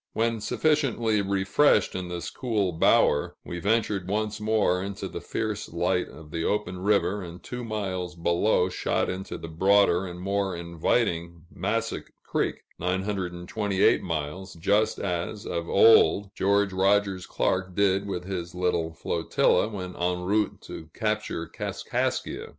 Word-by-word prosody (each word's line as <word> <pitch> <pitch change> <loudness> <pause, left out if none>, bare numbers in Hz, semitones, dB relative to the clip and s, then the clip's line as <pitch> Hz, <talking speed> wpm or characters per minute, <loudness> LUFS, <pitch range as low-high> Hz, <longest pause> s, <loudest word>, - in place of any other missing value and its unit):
When 115 0 0
sufficiently 120 -6 +1
refreshed 100 +5 +3
in 90 -1 -4
this 90 -1 -5
cool 110 -7 -1
bower, 80 -3 +3
we 85 - -5
ventured 105 -1 0
once 105 +1 -1
more 105 -4 +2
into 100 0 -5
the - - -7
fierce - - -3
light - - 0
of 75 0 -13
the 85 -1 -2
open 100 -3 -1
river, 100 0 +1
and 85 -1 -9
two 125 0 -6
miles 95 -5 -3
below 85 +3 +2
shot 95 - -1
into 95 +1 -5
the - - -8
broader 95 +2 +3
and 90 0 -8
more 100 0 -1
inviting 85 0 -1
Massac 115 +5 -2 0.2
Creek - - -2 0.2
(928 95 +2 0
miles), 85 +3 -4
just 100 +6 +2
as, 90 +3 -3
of 85 -1 -3
old, 100 -1 +5
George 100 0 +2
Rogers 95 -1 +2
Clark 90 -1 -1
did 100 0 +2
with 90 -3 -3
his 90 -2 -5
little 85 -2 0
flotilla, 85 +5 +1
when 95 -4 -6
en 90 0 -1
route 105 +3 0
to 80 - -9
capture 105 -6 -2
Kaskaskia. - - -3
95 Hz, 140 wpm, -26 LUFS, 90-105 Hz, 0.2 s, old